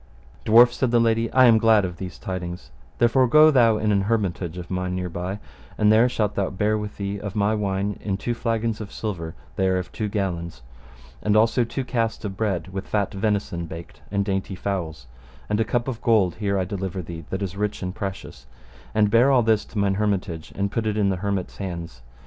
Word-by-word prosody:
Dwarf, 120 Hz, +3 st, +7 dB
said 130 Hz, -, 0 dB
the 120 Hz, 0 st, +3 dB
lady, 115 Hz, 0 st, +2 dB
I 130 Hz, -1 st, +6 dB
am 115 Hz, -2 st, +6 dB
glad 110 Hz, -3 st, +4 dB
of 90 Hz, -1 st, -6 dB
these 90 Hz, -3 st, -7 dB
tidings, 90 Hz, -5 st, -6 dB, 0.3 s
therefore 120 Hz, +2 st, +4 dB
go 155 Hz, +5 st, +7 dB
thou 115 Hz, -5 st, +4 dB
in 105 Hz, 0 st, 0 dB
an 100 Hz, -1 st, +3 dB
hermitage 95 Hz, -5 st, -1 dB
of 90 Hz, 0 st, -8 dB
mine 90 Hz, 0 st, -2 dB
hereby, 90 Hz, +2 st, -4 dB, 0.4 s
and 105 Hz, 0 st, +4 dB
there 115 Hz, +3 st, +5 dB
shalt 105 Hz, -4 st, -1 dB
thou 100 Hz, -1 st, -1 dB
bear 105 Hz, +3 st, 0 dB
with 105 Hz, -1 st, -5 dB
thee 100 Hz, 0 st, -3 dB
of 100 Hz, -2 st, -6 dB
my 105 Hz, +1 st, +2 dB
wine 100 Hz, -1 st, -1 dB
in 100 Hz, -2 st, -2 dB
two 120 Hz, -, -2 dB
flagons 115 Hz, -1 st, -1 dB
of 100 Hz, -, -7 dB
silver, 85 Hz, -7 st, -5 dB, 0.2 s
they 95 Hz, -, +2 dB
are 95 Hz, 0 st, +2 dB
of 90 Hz, 0 st, -4 dB
two 105 Hz, -1 st, -3 dB
gallons, 85 Hz, -, -3 dB, 0.6 s
and 105 Hz, 0 st, +2 dB
also 115 Hz, +3 st, +3 dB
two 130 Hz, +3 st, -4 dB
cast 115 Hz, -3 st, -1 dB
of 95 Hz, -2 st, -4 dB
bread 95 Hz, -3 st, -2 dB
with 95 Hz, +1 st, -6 dB
fat 105 Hz, -1 st, -1 dB
venison 100 Hz, -4 st, -1 dB
baked, 85 Hz, +1 st, -10 dB
and 100 Hz, 0 st, 0 dB
dainty 95 Hz, -1 st, -2 dB
fowls; 85 Hz, -7 st, -4 dB, 0.4 s
and 105 Hz, 0 st, 0 dB
a -, -, +4 dB
cup 120 Hz, +3 st, -1 dB
of 120 Hz, -3 st, -4 dB
gold 105 Hz, -7 st, +3 dB
here 100 Hz, -2 st, 0 dB
I 95 Hz, -, 0 dB
deliver 95 Hz, -1 st, -4 dB
thee, 80 Hz, 0 st, -8 dB
that 95 Hz, +1 st, -3 dB
is 95 Hz, -1 st, -4 dB
rich 105 Hz, -1 st, -2 dB
and 90 Hz, 0 st, -3 dB
precious; 95 Hz, 0 st, -7 dB, 0.5 s
and 105 Hz, -1 st, +3 dB
bear 120 Hz, +4 st, +5 dB
all 130 Hz, -3 st, +4 dB
this 110 Hz, -1 st, +2 dB
to -, -, -10 dB
mine 100 Hz, -1 st, +2 dB
hermitage, 90 Hz, -6 st, -2 dB
and 100 Hz, 0 st, -1 dB
put 115 Hz, -1 st, -1 dB
it 105 Hz, 0 st, -1 dB
in 100 Hz, -2 st, +2 dB
the 95 Hz, -, 0 dB
hermit's 100 Hz, -1 st, -3 dB
hands. 85 Hz, -9 st, -6 dB
100 Hz, 215 wpm, -24 LUFS, 95-110 Hz, 0.6 s, Dwarf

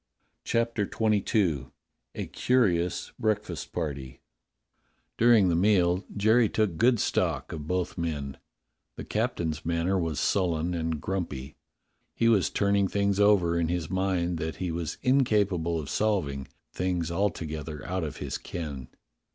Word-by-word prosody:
CHAPTER 115 Hz, -3 st, 0 dB
XXII 100 Hz, -, +1 dB, 0.5 s
A -, -, -3 dB
CURIOUS 90 Hz, -9 st, +1 dB
BREAKFAST 105 Hz, -6 st, -2 dB
PARTY 70 Hz, -4 st, -4 dB, 1.0 s
DURING 115 Hz, -5 st, +6 dB
the 85 Hz, -, +2 dB
meal 90 Hz, -1 st, +3 dB
Jerry 110 Hz, +2 st, +4 dB
took 105 Hz, -6 st, 0 dB
good 120 Hz, +4 st, +4 dB
stock -, -, 0 dB
of 75 Hz, -1 st, -6 dB
both 90 Hz, 0 st, -2 dB
men. 70 Hz, -5 st, -3 dB, 0.6 s
The -, -, -6 dB
captain's 80 Hz, -3 st, -2 dB
manner 85 Hz, +3 st, 0 dB
was 80 Hz, -4 st, -2 dB
sullen 90 Hz, -3 st, +1 dB
and 80 Hz, -2 st, -2 dB
grumpy. 75 Hz, -8 st, -4 dB, 0.6 s
He 115 Hz, -, +2 dB
was 105 Hz, -7 st, +4 dB
turning 100 Hz, -1 st, +2 dB
things 100 Hz, 0 st, 0 dB
over 95 Hz, -5 st, +4 dB
in 85 Hz, -, +1 dB
his 85 Hz, -1 st, -2 dB
mind 90 Hz, -3 st, 0 dB
that 80 Hz, 0 st, -3 dB
he 90 Hz, -2 st, -3 dB
was 80 Hz, -2 st, -3 dB
incapable 100 Hz, -10 st, +2 dB
of 75 Hz, -, -6 dB
solving 75 Hz, -10 st, -1 dB
— -, -, -54 dB
things 90 Hz, -2 st, -1 dB
alto 90 Hz, -2 st, 0 dB
gether 75 Hz, -1 st, -6 dB
out 90 Hz, 0 st, -2 dB
of 75 Hz, -, -5 dB
his -, -, -4 dB
ken. 70 Hz, -7 st, -6 dB
90 Hz, 140 wpm, -28 LUFS, 80-100 Hz, 1.0 s, DURING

